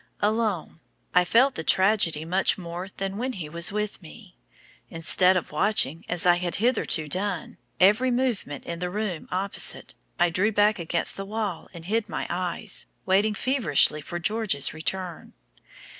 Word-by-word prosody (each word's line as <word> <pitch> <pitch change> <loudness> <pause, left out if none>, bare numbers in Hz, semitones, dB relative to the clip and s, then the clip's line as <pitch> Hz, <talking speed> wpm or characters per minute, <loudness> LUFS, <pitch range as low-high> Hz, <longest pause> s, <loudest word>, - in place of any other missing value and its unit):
Alone, 210 -6 -1 0.3
I 180 - +5
felt 250 +9 +4
the 160 - -5
tragedy 185 -5 +2
much 185 +3 +2
more 175 0 -6
than 195 0 -3
when 255 +3 -2
he 175 -8 -6
was 170 +4 -1
with 210 -1 -3
me. 180 +3 -14 0.5
Instead 180 +3 +3
of 175 - -4
watching, 165 -2 +1
as 175 0 +3
I 175 -1 +5
had 175 -1 -2
hitherto 220 -9 +1
done, 185 +2 -3 0.2
every 210 +7 +5
movement 240 - -1
in 170 0 -5
the 180 0 -2
room 195 -4 -3
opposite, 195 +2 0 0.2
I 175 -1 +3
drew 195 +6 +2
back 205 0 +3
against 170 0 -1
the 195 - -5
wall 205 -4 -4
and 170 -2 -10
hid 215 +2 -1
my - - -3
eyes, 180 +3 -1 0.2
waiting 205 +3 +2
feverishly 185 - +2
for 175 +4 -5
George's 200 -5 0
return. 175 +2 -4
185 Hz, 160 wpm, -25 LUFS, 170-210 Hz, 0.5 s, I